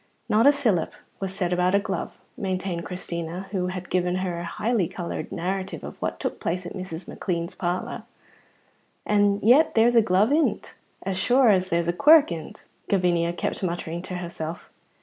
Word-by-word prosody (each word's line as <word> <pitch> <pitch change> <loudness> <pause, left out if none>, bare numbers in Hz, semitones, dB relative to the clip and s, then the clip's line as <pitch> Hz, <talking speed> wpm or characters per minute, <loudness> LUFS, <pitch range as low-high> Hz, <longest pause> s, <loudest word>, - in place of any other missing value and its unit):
"Not 220 +5 +4
a - - +9
sylup 225 - 0 0.3
was 195 -1 -3
said 180 -2 -1
about 180 +2 +2
a - - +5
glove," 200 - -4 0.2
maintained 185 -5 -3
Christina, 175 0 -5
who 185 -3 -1
had 180 0 -6
given 180 0 +1
her 185 -2 -2
a - - -5
highly 215 +1 0
coloured 175 0 -5
narrative 190 +2 -3
of - - -9
what - - -2
took - - -3
place 180 +2 -2
in 175 - -6
Mrs. 185 -3 -7
McLean's 170 -1 -3
parlour. 180 0 -3 1.0
"And 205 -1 +3
yet 265 +9 +5
there's 235 +2 +4
a 230 - +8
glove 205 +3 +3
in't 310 +2 +1 0.3
as 190 -1 -2
sure 245 +5 +4
as 185 -2 +3
there's 170 0 +1
a 175 - +1
quirk 300 - +6
in't," 165 -2 -7 0.3
Gavinia 175 -3 +2
kept 205 - -2
muttering 170 -2 -3
to 185 0 -6
herself. 170 -2 -6
185 Hz, 175 wpm, -25 LUFS, 175-205 Hz, 1.0 s, a